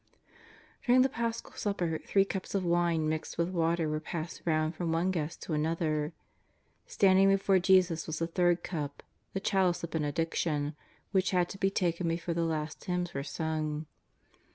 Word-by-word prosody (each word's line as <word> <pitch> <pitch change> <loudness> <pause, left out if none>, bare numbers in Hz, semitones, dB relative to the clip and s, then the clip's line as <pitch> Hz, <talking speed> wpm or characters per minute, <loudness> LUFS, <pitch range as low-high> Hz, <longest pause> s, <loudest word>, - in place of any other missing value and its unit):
During 255 0 +5
the 265 - +2
Paschal 230 -4 -3
supper 175 -6 -2
three 195 -1 +4
cups 190 0 -4
of 195 - +1
mne 170 -1 +2
mixed 155 0 -2
with 170 +1 +1
water 165 -2 +1
were 155 0 -1
passed 160 +1 -5
round 155 -1 +1
from 170 0 -2
one 170 +3 +1
guest 160 -3 -3
to 160 - -4
another. 155 0 0 0.8
Standing 195 0 +5
before 195 -1 +4
Jesus 180 -3 +3
was 160 -1 -3
the 165 - 0
third 175 0 +2
cup, 150 -5 -4
" - - -44
the 195 - -1
chalice 190 -3 +1
of 170 - -4
benediction," 150 -1 -1 0.4
which 190 -1 +2
had 180 -2 +2
to 195 - -8
be 195 - +3
taken 175 -3 0
before 170 +1 -1
the 170 - -1
last 155 -2 -3
hymns 180 -1 -2
were 140 - -2
sung. 155 0 -2
170 Hz, 175 wpm, -30 LUFS, 155-185 Hz, 0.8 s, During